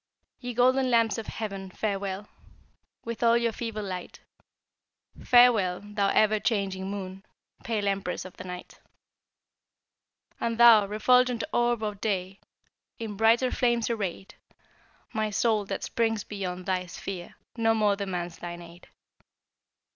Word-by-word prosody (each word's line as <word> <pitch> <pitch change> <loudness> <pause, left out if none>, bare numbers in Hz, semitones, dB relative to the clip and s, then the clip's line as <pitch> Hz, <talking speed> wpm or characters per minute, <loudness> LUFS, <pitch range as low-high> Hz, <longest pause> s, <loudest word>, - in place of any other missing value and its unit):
Ye 245 -2 -6
golden 255 +2 +3
lamps 230 -2 +2
of 220 - -7
heaven, 195 -3 -5
farewell, 200 0 -3 0.8
With 230 -1 -5
all 235 0 +5
your 235 -1 +1
feeble 225 -2 -5
light; 185 -2 -6 1.0
Farewell, 225 -8 +5
thou 205 -1 -1
ever 215 +1 +3
changing 195 -4 -1
Moon, 195 -1 -6 0.4
Pale 215 -3 -1
empress 195 -2 -2
of 185 - -10
the - - -7
Night. 180 -1 -9 1.6
And 230 -1 -1
thou, 230 -4 +7
refulgent 250 +3 +3
Orb 240 -2 +1
of 210 -1 -4
Day, 195 -2 -2 0.6
In 220 -3 -5
brighter 230 +4 +3
flames 240 -2 +1
arrayed; 195 -4 -4 0.8
My 215 -1 0
soul, 210 0 +1
that 195 0 -4
springs 225 -2 0
beyond 185 -3 -5
thy 185 -1 -1
sphere, 175 0 -7 0.2
No 225 -1 +2
more 210 -2 +2
demands 180 -4 -4
thine 175 0 -7
aid. 170 +1 -15
210 Hz, 130 wpm, -27 LUFS, 190-230 Hz, 1.6 s, thou